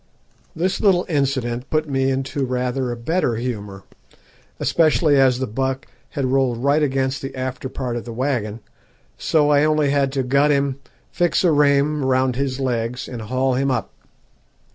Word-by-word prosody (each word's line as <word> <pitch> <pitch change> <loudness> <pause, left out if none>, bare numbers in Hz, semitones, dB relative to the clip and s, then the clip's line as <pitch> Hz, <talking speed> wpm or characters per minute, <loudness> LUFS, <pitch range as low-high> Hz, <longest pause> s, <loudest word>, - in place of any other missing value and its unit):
This 185 +4 -1
little 185 -4 +3
incident 130 -5 -1
put 155 0 0
me 135 -1 +1
into 135 +1 -2
rather 125 0 -1
a - - -3
better 130 0 0
humour, 105 -5 -5 0.8
especially 155 -2 +3
as 130 -2 +4
the 130 - -2
buck 130 +3 -2 0.3
had 140 - +1
rolled 130 -3 +2
right 145 +2 +3
against 135 -1 0
the 135 - -6
after 130 0 -4
part 125 -2 -4
of 120 - -5
the 120 - -6
waggon, 115 -3 -2 0.6
so 150 -2 +2
I 145 - +5
had 150 - +3
only 155 -2 +2 0.2
to 135 0 -2
gut 140 +3 +3
him, 140 -1 +1 0.3
fix 175 0 +1
a 175 - +4
reim 145 0 +3
round 130 -1 +1
his 135 0 -2
legs, 125 -2 -2
and 120 -3 -6
haul 130 +4 0
him 135 +2 0
up. 120 -6 -2
135 Hz, 165 wpm, -21 LUFS, 125-145 Hz, 0.8 s, I